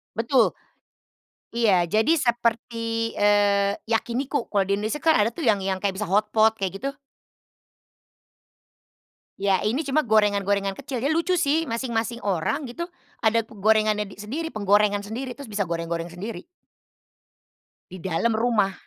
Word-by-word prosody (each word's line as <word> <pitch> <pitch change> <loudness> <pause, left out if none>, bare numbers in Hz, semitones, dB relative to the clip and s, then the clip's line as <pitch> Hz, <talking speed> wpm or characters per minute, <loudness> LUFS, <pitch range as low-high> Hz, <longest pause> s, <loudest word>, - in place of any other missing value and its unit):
Betul. 235 +4 +2 1.0
Iya, 195 -7 +3
jadi 220 - +2
seperti, 230 -1 -1
eee, 205 -1 +3
yakiniku 240 +4 -1
kalau 195 -2 +1
di 200 - +2
Indonesia 215 +8 -3
kan 320 -1 +3
ada 210 +2 +3
tuh 295 +1 -4
yang 205 -3 +3
yang 190 -1 -1
kayak 195 -1 -1
bisa 205 - -3
hotpot 215 +3 +3
kayak 195 +4 -3
gitu? 275 - -1 2.5
Ya, 195 -1 +2
ini 265 +9 0
cuma 280 +2 +1
gorengan-gorengan 205 -4 +2
kecil 260 -3 -5
ya 280 - +2
lucu 335 +3 +1
sih 315 0 +1
masing-masing 235 0 -2
orang 200 - -1
gitu 340 +7 -5 0.3
ada 230 0 +2
ku 215 -2 -15
gorengannya 215 0 +2
di 195 - -12
sendiri, 265 +11 -4
penggorengan 205 -3 +2
sendiri 245 +5 -5
terus 280 -6 -10
bisa 205 -2 -1
goreng-goreng 165 0 -3
sendiri. 195 - -7 1.4
Di 185 -1 -9
dalam 190 +6 0
rumah. 220 -4 +1
215 Hz, 140 wpm, -24 LUFS, 200-240 Hz, 2.5 s, Iya